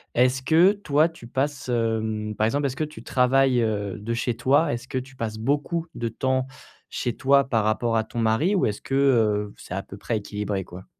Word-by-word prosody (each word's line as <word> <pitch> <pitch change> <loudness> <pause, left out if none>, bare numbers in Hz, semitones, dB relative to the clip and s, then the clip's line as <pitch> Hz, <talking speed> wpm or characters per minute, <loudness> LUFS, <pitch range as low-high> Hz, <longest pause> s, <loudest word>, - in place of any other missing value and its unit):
Est-ce 130 +2 +3
que 165 +8 +5
toi 160 -6 +2
tu 140 -8 -13
passes, 135 +1 -2
hem, 110 -2 -1
par 110 - +1
exemple, 140 +5 0
est-ce 135 - -1
que 155 - 0
tu 155 - -11
travailles, 130 -1 +3
heu, 105 -3 -2
de 115 +3 -3
chez 120 -1 -1
toi? 135 +5 +2
Est-ce 120 +2 -6
que 130 - -3
tu 130 +1 -6
passes 110 -2 -4
beaucoup 145 +7 -1
de 120 - -3
temps 130 +3 -1 0.4
chez 120 - -3
toi 140 +1 +4
par 115 -5 +1
rapport 115 +1 +1
à 110 - +1
ton 115 - -10
mari? 115 - +2
Ou 185 - +2
est-ce 105 -1 -2
que, 135 - -3
heu, 110 -7 +2
c'est - - -9
à 95 - -3
peu 100 - -11
près 110 +2 -2
équilibré 105 -1 -3
quoi? 90 +1 -11
120 Hz, 220 wpm, -24 LUFS, 110-135 Hz, 0.4 s, que